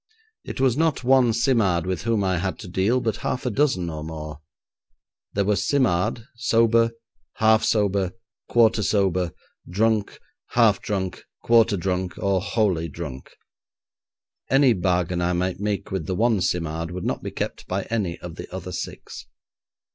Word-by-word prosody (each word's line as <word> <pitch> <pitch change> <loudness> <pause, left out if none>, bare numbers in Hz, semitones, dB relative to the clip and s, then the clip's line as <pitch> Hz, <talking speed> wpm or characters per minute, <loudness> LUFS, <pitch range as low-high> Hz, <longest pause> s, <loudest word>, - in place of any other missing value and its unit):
It - - -7
was 130 -3 +3
not 160 -3 +1
one 130 -2 +4
Simard 110 -8 +2
with 90 -2 -2
whom 110 -2 0
I 95 -2 +1
had 95 +1 -2
to - - -8
deal, 95 +8 +1
but 110 -2 -1
half 130 - -3
a 125 - 0
dozen 130 -8 +1
or 80 -2 -5
more. 75 -2 -7 0.9
There 100 -1 +1
was 100 0 +1
Simard, 115 -5 +1
sober, 115 0 +3 0.5
half 110 0 +4
sober, 100 -3 +1 0.4
quarter 115 -2 +4
sober, 95 -4 +1 0.4
drunk, 110 +2 0 0.3
half - - +4
drunk, 95 -3 -3 0.2
quarter 115 -3 +4
drunk, 90 0 -2
or 100 -2 +1
wholly 95 -6 0
drunk. 70 -4 -7 1.2
Any 135 -2 +5
bargain 90 -2 0
I 90 +1 +1
might 90 +1 -1
make 105 -1 -2
with 95 -5 -3
the 95 - -1
one 110 -1 +2
Simard 80 -2 -1
would 90 0 -5
not - - -2
be - - -4
kept - - -5
by 95 +1 -2
any 100 -7 -1
of 85 -2 -8
the - - -8
other - - -6
six. - - -7
100 Hz, 155 wpm, -24 LUFS, 90-115 Hz, 1.2 s, Any